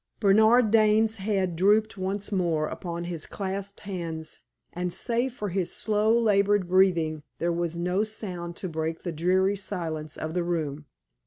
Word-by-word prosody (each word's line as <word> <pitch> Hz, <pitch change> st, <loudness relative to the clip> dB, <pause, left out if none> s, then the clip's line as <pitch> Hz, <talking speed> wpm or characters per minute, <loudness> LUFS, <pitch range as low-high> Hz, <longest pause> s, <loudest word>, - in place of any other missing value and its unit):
Bernard 220 Hz, +2 st, +5 dB
Dane's 220 Hz, 0 st, +4 dB
head 190 Hz, -3 st, -1 dB
drooped 210 Hz, +5 st, +3 dB
once 195 Hz, +2 st, -3 dB
more 170 Hz, -5 st, +1 dB
upon 170 Hz, -1 st, -5 dB
his 170 Hz, -3 st, -4 dB
clasped 195 Hz, 0 st, -5 dB
hands, 165 Hz, -5 st, -5 dB, 0.3 s
and 180 Hz, 0 st, -2 dB
save 240 Hz, +6 st, -1 dB
for 210 Hz, -3 st, -3 dB
his 185 Hz, -1 st, -1 dB
slow, 215 Hz, +1 st, +2 dB
labored 205 Hz, -3 st, +3 dB
breathing, 175 Hz, -4 st, +3 dB, 0.2 s
there 170 Hz, 0 st, 0 dB
was 170 Hz, 0 st, -2 dB
no 180 Hz, +4 st, +1 dB
sound 180 Hz, -6 st, -5 dB
to 185 Hz, -, -5 dB
break 160 Hz, 0 st, -3 dB
the 175 Hz, -, -3 dB
dreary 185 Hz, +5 st, +2 dB
silence 165 Hz, -6 st, -5 dB
of 155 Hz, 0 st, -4 dB
the 175 Hz, 0 st, 0 dB
room. 155 Hz, -4 st, -3 dB
185 Hz, 155 wpm, -27 LUFS, 170-205 Hz, 0.3 s, Bernard